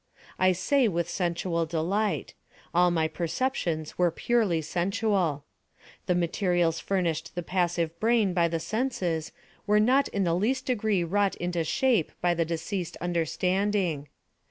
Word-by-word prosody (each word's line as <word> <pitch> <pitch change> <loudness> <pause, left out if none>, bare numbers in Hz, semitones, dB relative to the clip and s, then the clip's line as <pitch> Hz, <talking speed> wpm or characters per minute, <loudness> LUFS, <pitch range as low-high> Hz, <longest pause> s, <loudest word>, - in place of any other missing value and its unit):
I 185 0 +5
say 245 +9 +2
with 170 -4 0
a - - -12
sensual 170 -2 -1
delight. 175 +2 -1 0.4
All 175 +1 +4
my 165 -2 +1
perceptions 165 - -2
were 175 -1 +4
purely 205 -1 +1
sensual. 180 -4 0 0.6
The 180 - +2
materials 175 -1 +1
furnished 175 -5 -2
the 175 - -3
passive 170 -2 -1
brain 220 -4 +2
by 170 -1 +3
the 165 0 -2
senses 180 -7 -2 0.4
were 210 +1 +4
not 255 +6 +4
in 200 - -1
the 170 -2 +1
least 250 +9 0
degree 215 -7 +1
wrought 200 +3 +1
into 175 -1 -2
shape 230 - +1
by 175 0 +2
the 170 -1 0
deceased 170 +2 -4
understanding. 175 -1 0
175 Hz, 140 wpm, -27 LUFS, 165-205 Hz, 0.6 s, I